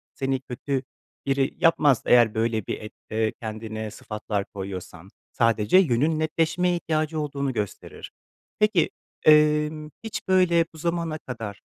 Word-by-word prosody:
seni 135 -1 -1
kötü 135 +1 -3 0.4
biri 135 0 +1
yapmaz; 145 -6 +4
eğer 120 -3 +5
böyle 110 -2 -1
bir - - -4
et 105 - -9 0.2
eee, 110 0 0
kendine 110 -1 -5
sıfatlar 105 -2 -4
koyuyorsan, 95 -3 -8 0.2
sadece 115 - +3
yönün 155 -1 +3
netleşmeye 165 +3 +1
ihtiyacı 155 -1 -1
olduğunu 140 -2 -2
gösterir. 105 -3 -5 0.5
Peki, 210 -5 +3 0.4
emm, 150 0 +4
hiç 225 - -6
böyle 175 -3 +4
bu - - -13
zamana 170 -1 -2
kadar, 115 -7 -7
135 Hz, 130 wpm, -25 LUFS, 110-155 Hz, 0.5 s, eğer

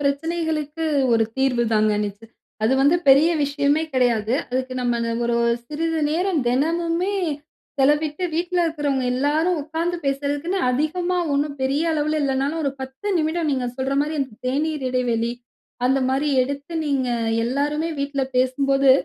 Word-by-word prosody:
பிரச்சனைகளுக்கு 315 +1 -1 0.3
ஒரு 225 -1 +4
தீர்வு 255 -3 +2
தாங்க 215 0 +3
நிச்சய 205 +3 -10 0.4
அது 240 - +3
வந்து 290 +5 +5
பெரிய 280 +5 +7
விஷயமே 285 +2 +1
கெடையாது. 240 -4 +1 0.2
அதுக்கு 255 0 -2
நம்ம 240 -1 0
அந்த 230 0 -1
ஒரு 235 0 +1 0.3
சிறிது 325 +2 -2
நேரம் 350 -1 +1
தெனமுமே 335 +8 +1 0.7
செலவிட்டு, 295 +5 +2
வீட்ல 350 +2 0
இருக்குறவங்க 290 -5 -1
எல்லாரும் 305 +6 +1
உக்காந்து 330 +3 -2
பேசுறதக்குன்னு 290 +7 -1
அதிகமா 350 +7 0
ஒண்ணும் 285 0 0
பெரிய 275 +4 +1
அளவுல 305 0 0
இல்லனாலும், 275 +4 0
ஒரு 275 - +1
10 265 +10 -5
நிமிடம் 315 0 0
நீங்க 260 -3 -1
சொல்ற 265 +1 -1
மாரி 300 +2 -1
அந்த 265 -4 -3
தேநீர் 295 +1 -1
இடைவெளி 240 -2 0 0.5
அந்த 265 +1 +3
மாதிரி 275 +3 +1
எடுத்து, 280 +4 -5
நீங்க 270 -3 0 0.4
எல்லாருமே 290 +5 -1
வீட்ல 280 -1 -1
பேசும்போது, 270 +1 +3
280 Hz, 140 wpm, -22 LUFS, 260-320 Hz, 0.7 s, பெரிய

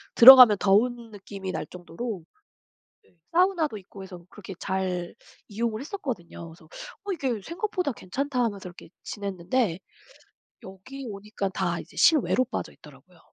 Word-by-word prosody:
들어가면 250 -3 +10
더운 230 +4 +1
느낌이 200 -2 -7
날 155 - -4
정도로 180 +3 -7 0.8
네 - - -30 0.2
사우나도 345 - +2
있고 195 0 -13
해서 180 -2 -11
그렇게 195 -2 -10
잘 185 -2 -3 0.3
이용을 220 +1 -3
했었거든요. 250 - -6
그래서 160 -1 -17 0.4
'어 405 - -2
이게 260 - -2
생각보다 360 - -3
괜찮다.' 255 +6 -3
하면서 200 -5 -3
이렇게 175 - -14
지냈는데 200 0 -2 0.9
여기 255 +9 -10
오니깐 200 -1 -5
다 175 -2 -1
이제 - - -12
실외로 295 -5 +4
빠져 255 - -5
있더라고요. - - -18
210 Hz, 340 characters per minute, -26 LUFS, 185-260 Hz, 0.9 s, 들어가면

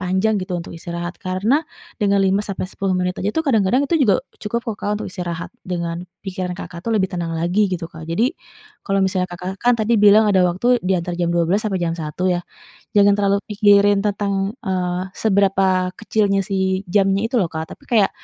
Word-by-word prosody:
panjang 190 +4 +1
gitu 185 -1 -3
untuk 170 - -7
istirahat, 170 +1 -6
karena 205 - +1 0.4
dengan 200 -1 +3
5-10 195 -1 -1
menit 180 0 0
aja 195 - -1
tuh 320 +7 -1
kadang-kadang 240 0 +2
itu 310 - -1
juga 210 -9 +3 0.2
cukup 235 +3 -3
loh - - -10
Kak 205 - -2
untuk - - -5
istirahat 175 -1 -5
dengan 170 -2 -3 0.2
pikiran 185 -1 -4
Kakak 170 -3 -8
tuh 230 - -4
lebih 190 -2 0
tenang 165 -2 -3
lagi 180 +5 +1
gitu 175 -2 -3
Kak. 160 -1 -11
Jadi 225 - +1 0.5
kalau 195 -1 0
misalnya 185 -1 0
Kakak 180 +2 -6
kan 245 0 +3
tadi 225 +1 +1
bilang 210 +1 +7
ada 190 -3 +4
waktu 240 +8 +2
diantar 180 -1 -1
jam 170 -1 -1
12.00 170 +4 +1
sampai 210 -3 -1
jam 170 -1 -1
1.00 165 +2 -4
ya, 175 - -1 0.6
jangan 200 0 +6
terlalu 200 -1 +2
pikirin 205 -1 +4
tentang, 200 0 -1
eee, 180 -2 -1
seberapa 190 -3 +2
kecilnya 205 -2 +1
sih 190 0 -1
jamnya 195 +3 +2
itu 255 - 0
loh 180 -7 0
Kak, 160 0 -5
tapi - - -23
kayak 215 -5 +3
190 Hz, 190 wpm, -20 LUFS, 180-205 Hz, 0.6 s, bilang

